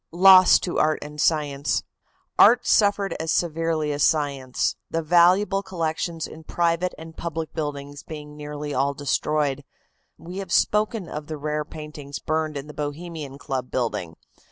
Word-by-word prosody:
LOSS 185 +2 +7
TO 175 - -2
ART 155 0 +3
AND 150 0 -6
SCIENCE. 145 -3 +1 0.6
Art - - +7
suffered 200 -3 +3
as 160 0 -1
severely 165 -2 0
as 145 0 -3
science, 140 -5 +1
the 165 0 -2
valuable 180 +4 +4
collections 165 -3 -3
in 160 - -11
private 170 +2 0
and 160 0 -11
public 165 -1 -5
buildings 145 -2 -5
being 150 -1 -9
nearly 150 0 -6
all 140 +2 0
destroyed. 145 0 0 0.5
We 175 +3 -9
have 190 -3 -7
spoken 210 -1 +1
of 150 -1 -6
the 155 - -5
rare 150 +1 -2
paintings 150 -2 -8
burned 155 -1 -2
in 140 - -6
the 150 - -10
Bohemian 150 -1 -6
Club 130 -2 -4
building. 100 -9 -2
155 Hz, 150 wpm, -24 LUFS, 145-170 Hz, 0.6 s, LOSS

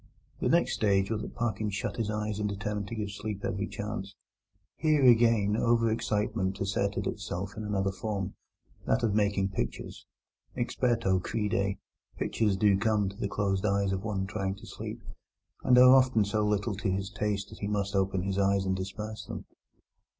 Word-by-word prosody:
The - - +1
next - - +3
stage 100 -1 +2
was 110 -1 -1
that - - -7
Parkins 110 -3 -1
shut 115 -1 -3
his 110 -3 -1
eyes 105 -1 -2
and 105 -1 0
determined 100 0 -3
to 115 - -5
give 105 -2 -3
sleep 100 0 -5
every 100 +1 -2
chance. 100 -2 -5 0.6
Here 155 -3 +3
again 115 -4 +5
over 115 0 +3
excitement 105 -4 -1
asserted 100 +1 -1
itself 95 +3 -4
in 110 - -5
another 100 -2 0
form—that 100 +2 -4
of 110 -3 +2
making 100 -2 +2
pictures. 65 -10 -5 0.5
Experto 115 -6 +1
crede, 100 -1 -1 0.4
pictures 105 -4 0
do 100 -1 +4
come 105 -2 +2
to 100 - -11
the 100 - -2
closed 100 -2 0
eyes 100 -1 +1
of 95 +1 -2
one 100 -3 -1
trying 95 -1 -2
to 100 - -13
sleep, - - -7 0.6
and 125 - +5
are 125 +1 +9
often 130 -5 +5
so 105 +1 0
little 105 +1 0
to 100 - -1
his 95 +1 -2
taste 105 -1 -2
that - - -11
he 100 - -2
must 100 -1 -1
open 95 -1 +1
his 95 0 -1
eyes 100 0 +2
and 95 0 +1
disperse 105 +3 -5
them. - - -6
105 Hz, 175 wpm, -29 LUFS, 95-110 Hz, 0.6 s, are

